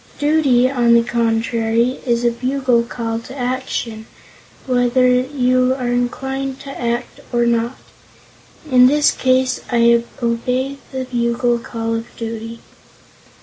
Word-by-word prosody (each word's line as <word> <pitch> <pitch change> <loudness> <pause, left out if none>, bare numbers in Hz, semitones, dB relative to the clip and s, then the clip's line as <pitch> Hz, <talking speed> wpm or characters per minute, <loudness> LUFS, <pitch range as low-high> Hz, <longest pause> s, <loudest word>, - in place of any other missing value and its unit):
Duty, 290 -5 +3
on 240 -3 +3
the 235 - +5
contrary, 230 +1 0
is 240 0 +1
a 235 - +4
bugle 255 0 +1
call 230 -1 -4
to 260 +4 -11
action, 245 -3 -3 0.6
whether 250 0 +2
you 255 0 +1
are 245 -2 -2
inclined 265 +2 -2
to 275 - -8
act, 240 -2 -3
or 240 -1 +2
not. 235 +1 0 0.9
In 250 0 +7
this 295 +2 +4
case, 255 0 +1
I 235 0 +4 0.2
obey 250 +4 -1
the 260 -1 -4
bugle 240 0 0
call 230 -1 -4
of 225 0 -3
duty." 230 0 -6
245 Hz, 125 wpm, -18 LUFS, 235-260 Hz, 0.9 s, In